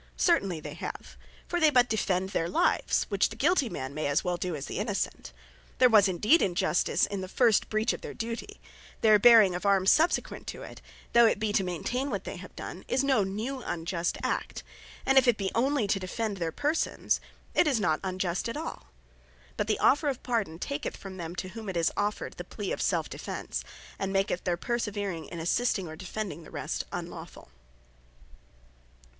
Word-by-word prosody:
Certainly 195 - +2
they - - -7
have: - - -7 0.3
For 350 - -1
they 315 -2 +6
but 250 -4 +4
defend 190 -4 0
their 165 -3 -1
lives, - - +2
which 200 -2 +2
the 220 - -8
guilty 285 +1 +2
man 130 -6 -5
may 155 +1 -2
as 145 +1 +1
well 180 -1 0
do, 175 -1 -3
as 140 -1 -5
the - - -4
Innocent. 205 -1 -3 0.5
There 255 -1 +6
was 210 -3 +7
indeed 210 - +3
injustice 175 -2 +2
in 200 -2 -4
the 185 - -5
first 225 +2 +3
breach 215 +2 +1
of - - -7
their - - -7
duty; 235 - -5 0.4
Their 215 -2 +6
bearing 220 -4 +7
of 180 - -4
Arms 195 -1 +4
subsequent 325 +3 +1
to - - -6
it, - - -10 0.3
though 235 -1 +7
it - - +2
be 215 -1 -1
to 195 - +3
maintain 245 - -2
what - - -3
they - - -6
have - - -11
done, - - -7
is 260 +1 +1
no 265 -7 +3
new 220 +8 -4
unjust 170 -2 -2
act. - - -2 0.4
And 270 0 +6
if 260 - 0
it 240 -3 +4
be 195 -2 -2
onely 260 0 +2
to 195 - +2
defend 205 +2 -3
their 165 -3 -2
persons, 300 - 0 0.3
it 350 - +4
is 270 -6 +2
not 160 -6 +1
unjust 185 +1 -2
at 230 - -4
all. 320 - -6 0.7
But 210 - -1
the 215 - +1
offer 290 +2 +3
of 265 -2 -4
Pardon 220 -10 -1
taketh 285 - -4
from 190 -1 -9
them, 170 0 -6
to 185 - -4
whom 215 +1 -7
it 185 - -3
is 165 0 +2
offered, 205 +1 -2
the - - -5
plea - - -5
of - - -2
self - - +1
defence, - - -5 0.4
and 195 0 -2
maketh 195 -2 0
their 175 -2 +1
perseverance 205 -6 -3
in 170 - -5
assisting, 190 +2 0
or 160 - -7
defending 185 -1 -5
the - - -13
rest, - - -4
unlawfull. - - -7
205 Hz, 195 wpm, -29 LUFS, 180-240 Hz, 0.7 s, was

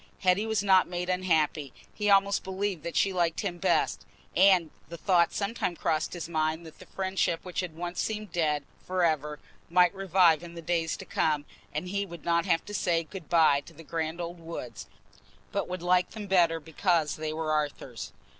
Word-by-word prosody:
Hetty 190 +3 +3
was 220 -2 0
not 190 -2 +5
made 175 0 -3
unhappy; 160 -6 +1 0.2
he 210 -1 -1
almost 200 0 +4
believed 190 -2 -2
that 170 +1 -6
she 195 - +2
liked 170 -3 +1
him 180 -4 -3
best; - - +1 0.3
and 185 -4 +5 0.2
the 170 - -7
thought 170 0 +3
sometimes 200 -4 -2
crossed 155 0 0
his 175 -3 -5
mind 160 0 -1
that 160 - -13
the - - -13
friendship 190 -3 -1
which 180 - -4
had 180 -4 -3
once 175 +1 -3
seemed 215 -3 -3
dead 150 -4 +1 0.2
for 185 -1 -1
ever 150 -2 0 0.3
might 180 +1 +5
revive 185 -4 +4
in 170 -1 -10
the 170 - -7
days 165 -1 0
to - - -9
come, 150 -2 0 0.3
and 165 +4 -4
he 200 +1 -1
would 170 -2 -10
not 170 -1 +2
have 165 - +2
to 205 - -8
say 170 -4 +1
"good 175 -1 -10
bye" 160 -4 +5
to - - -14
the 165 - -12
grand 160 +2 -3
old 170 0 -5
woods, 120 -11 -7 0.6
but 200 - -1
would 180 -1 -5
like 180 0 +3
them 215 -2 -7
better 175 -4 +3
because 160 0 0
they 155 0 -3
were 155 0 -2
Arthur's. 145 -6 -3
170 Hz, 195 wpm, -28 LUFS, 160-185 Hz, 0.6 s, not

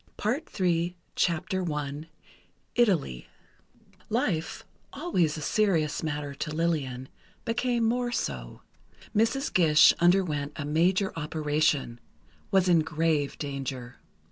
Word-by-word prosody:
PART 255 +10 -1
THREE 175 -2 0 0.3
I 160 -4 -3 0.7
ITALY 180 - +1 0.8
Life, 160 -1 -1 0.3
always 170 - 0
a - - -5
serious 165 -4 +1
matter 150 -2 -3
to 140 - -4
Lillian, 150 -6 -1 0.4
became 235 +1 0
more 240 +2 +1
so. 65 - -4 0.5
Mrs. 230 +6 +1
Gish 155 -4 +6
underwent 170 -5 +2
a 145 - -4
major 180 +6 +2
operation—was 150 - -1
in 175 -2 +5
grave 155 -2 0
danger. 135 -3 -5
160 Hz, 95 wpm, -28 LUFS, 145-190 Hz, 0.8 s, Gish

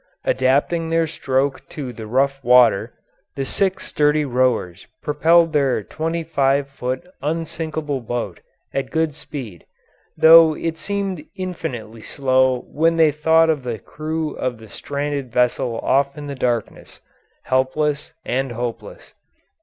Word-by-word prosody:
Adapting 145 +6 +1
their 165 0 +2
stroke 135 -3 -1
to 135 -5 -6
the 110 -1 -8
rough 135 +3 0
water, 120 -4 +5 0.4
the 135 - -2
six 190 +6 -1
sturdy 150 0 +2
rowers 125 -8 0 0.2
propelled 165 +2 +3
their 135 -7 +1
twenty 165 +7 -3
five 140 -3 +1
foot 130 0 -4 0.2
unsinkable 155 -2 -3
boat 115 -6 -4 0.3
at 135 0 -2
good 160 -2 0
speed, 120 - -8 0.5
though 160 -1 +8
it 165 +1 -3
seemed 195 -5 -3
infinitely 135 - -5
slow 130 0 +1
when 165 +2 +2
they 160 -2 +5
thought 160 +2 +3
of 150 -3 -2
the 120 -3 -4
crew 155 +5 -4
of 125 -2 -2
the 110 -1 -14
stranded 140 +1 -4
vessel 120 -1 +1
off 140 +2 +1
in 150 - -7
the 140 - -5
darkness, 120 -4 -3 0.4
helpless 145 +3 0
and 130 0 -1
hopeless. 125 - -6
140 Hz, 130 wpm, -21 LUFS, 125-160 Hz, 0.5 s, though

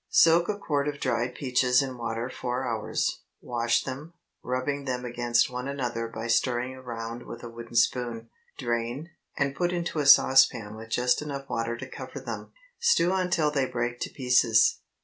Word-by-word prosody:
Soak 170 +2 +5
a 210 - -1
quart 145 -7 -1
of 145 -1 -3
dried 120 +1 -1
peaches 125 -1 +2
in 130 -1 -5
water 115 0 -3
four 125 0 -3
hours. 115 -3 -1 0.2
Wash 120 -1 0
them, 140 +6 -7 0.3
rubbing 135 +3 -2
them 125 -1 -3
against 120 +1 +1
one 125 +1 -4
another 120 -4 -3
by 115 0 -6
stirring 120 +2 +1
around 120 -2 -7
with 115 - -8
a 120 - -6
wooden 115 0 -10
spoon. 115 -1 +1 0.3
Drain, 120 +6 -3 0.3
and 140 -1 +1
put 175 +2 0
into 170 -3 -2
a 145 - 0
saucepan 130 -6 +6
with 110 +1 -10
just 125 +3 +2
enough 140 -2 -5
water 115 -1 -2
to - - -7
cover - - -8
them. - - -7 0.3
Stew 470 - +3
until 180 -5 +1
they 135 -3 +1
break 120 0 -3
to - - -3
pieces. 125 -4 +3
125 Hz, 170 wpm, -27 LUFS, 120-140 Hz, 0.3 s, saucepan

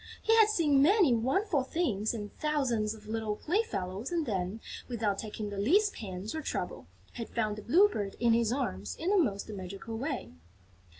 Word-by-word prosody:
He 450 - +3
had 435 -1 +7
seen 300 -9 +3
many 355 - +5
wonderful 280 - +1
things 255 - -1
and 205 -2 -6
thousands 250 -8 0
of 215 -1 -15
little 220 -1 -2
playfellows 245 - -2
and 335 -3 0
then, 195 -1 -2 0.3
without 215 -5 -1
taking 210 -1 -5
the 200 - -4
least 400 - +3
pains 190 -1 -6
or 315 - -3
trouble, - - -4 0.3
had 230 -2 -6
found 215 -3 -1
the 215 - -8
Blue 345 - +5
Bird 205 - -4
in 235 -1 +4
his 230 -1 +2
arms 100 - -2
in 345 +4 -1
the 410 - +4
most 200 -7 -2
magical 200 +2 -6
way. 270 +4 -3
230 Hz, 180 wpm, -31 LUFS, 210-315 Hz, 0.3 s, had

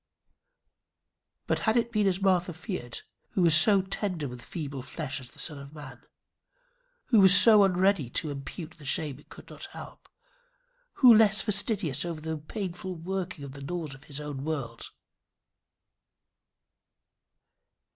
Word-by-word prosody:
But - - -1
had 220 +1 +1
it 235 0 0
been 210 -3 +1
as 190 -1 0
Martha 185 -2 +1
feared, 160 - -6 0.3
who 180 -3 +3
so 190 +5 +6
tender 185 -5 -3
with 125 -1 -9
feeble 140 -1 -6
flesh 145 +2 -6
as 125 - -12
the - - -21
Son 150 -4 -1
of 140 +2 -12
Man? 135 -5 -11 1.1
Who 210 -6 +6
so 210 +3 +7
unready 185 -6 +1
to 150 +4 -2
impute 155 +4 -9
the - - -14
shame 140 0 -1
it - - -21
could - - -14
not - - -8
help? - - -12 0.8
Who 250 -3 +7
less 215 -1 +4
fastidious 205 - +1
over 170 -2 -5
the 160 0 -5
painful 185 +2 -6
working 180 -2 -5
of 140 - -8
the 140 +1 -11
laws 160 0 -5
of 135 - -15
his 145 -1 -7
own 145 -2 -6
world? 145 -6 -5
170 Hz, 145 wpm, -27 LUFS, 145-195 Hz, 1.1 s, so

